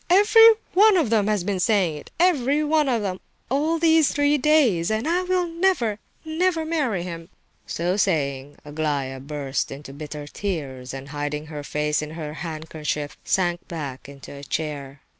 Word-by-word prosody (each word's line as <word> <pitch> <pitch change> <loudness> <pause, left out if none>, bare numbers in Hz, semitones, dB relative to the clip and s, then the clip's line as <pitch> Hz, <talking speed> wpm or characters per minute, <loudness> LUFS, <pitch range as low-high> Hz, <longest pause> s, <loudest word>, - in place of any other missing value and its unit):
"Every 440 +5 +7 0.2
one 415 +1 +6
of 290 -10 +1
them 210 -3 +3
has 210 -4 +1
been 195 0 -2
saying 185 -5 +2
it—every 295 - +1
one 300 -1 +2
of 235 -4 0
them—all 275 - -2
these 325 -2 +4
three 290 0 +2
days! 265 - +3
And 220 +5 -1
I 345 +2 +2
will 365 -1 0
never, 330 - 0 0.3
never 325 +1 0
marry 275 - -1
him!" 165 -2 -7 0.4
So 175 +3 -1
saying, 145 -7 0
Aglaya 145 -3 -2
burst 140 0 -3
into 135 0 -9
bitter 150 0 -7
tears, 140 -8 -5
and, 135 +1 -8
hiding 145 +1 -4
her 145 -1 -5
face 150 +1 -1
in 150 - -5
her 150 -2 -5
handkerchief, 155 -2 -4
sank 175 -2 0
back 145 -5 -6
into 140 0 -11
a 140 0 -10
chair. 145 -3 -4
180 Hz, 160 wpm, -23 LUFS, -, 0.4 s, Every